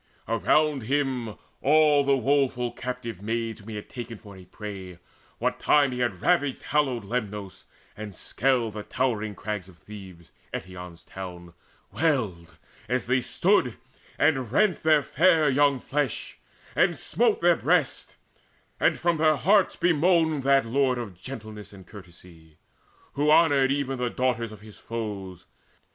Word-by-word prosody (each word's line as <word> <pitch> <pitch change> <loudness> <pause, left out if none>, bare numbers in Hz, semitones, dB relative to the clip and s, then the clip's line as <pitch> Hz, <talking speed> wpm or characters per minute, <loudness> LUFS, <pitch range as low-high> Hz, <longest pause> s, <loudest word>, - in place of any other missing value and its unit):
Around 140 +6 +2
him 130 -3 -1 0.3
all 150 0 +4
the 140 0 +3
woeful 130 -2 +1
captive 125 -5 -6
maids, 115 +1 -3
Whom 105 +1 -12
he 110 - -6
had 105 - -7
taken 120 -2 -7
for 100 -2 -13
a 95 -1 -13
prey, 95 -4 -8 0.4
what - - -1
time 145 -2 +3
He 125 - -4
had 120 -8 -2
ravaged 145 -7 +1
hallowed 135 -6 0
Lemnos, 105 -3 -5 0.3
and 110 0 -6
had 100 - -12
scaled 120 -3 0
The 105 - -5
towered 110 -3 -2
crags 105 -3 -5
of 90 - -17
Thebes, 95 -5 -12 0.2
Eetion's 90 -2 -8
town, 90 -2 -9 0.4
Wailed, 110 - -1 0.3
as 125 0 0
they 130 +1 +2
stood 170 - +1 0.4
and 135 -7 +1
rent 205 +5 +2
their 155 -2 +4
fair 160 +4 +3
young 140 0 +3
flesh, 140 -2 -3 0.4
And - - +3
smote - - +1
their - - +4
breasts, - - 0 0.6
and - - +3
from 170 -1 +1
their 155 0 +4
hearts 190 - +3
bemoaned 165 -2 +2
That 135 -1 +3
lord 130 +1 +1
of 115 -5 -5
gentleness 110 -4 -9
and 95 -2 -13
courtesy, 85 -5 -15 0.6
Who 145 +2 +1
honoured 145 -4 +5
even 135 -2 -1
the 125 -1 0
daughters 120 -3 -1
of 105 -2 -12
his 105 -1 -14
foes. 100 -6 -6
120 Hz, 150 wpm, -26 LUFS, 105-140 Hz, 0.6 s, honoured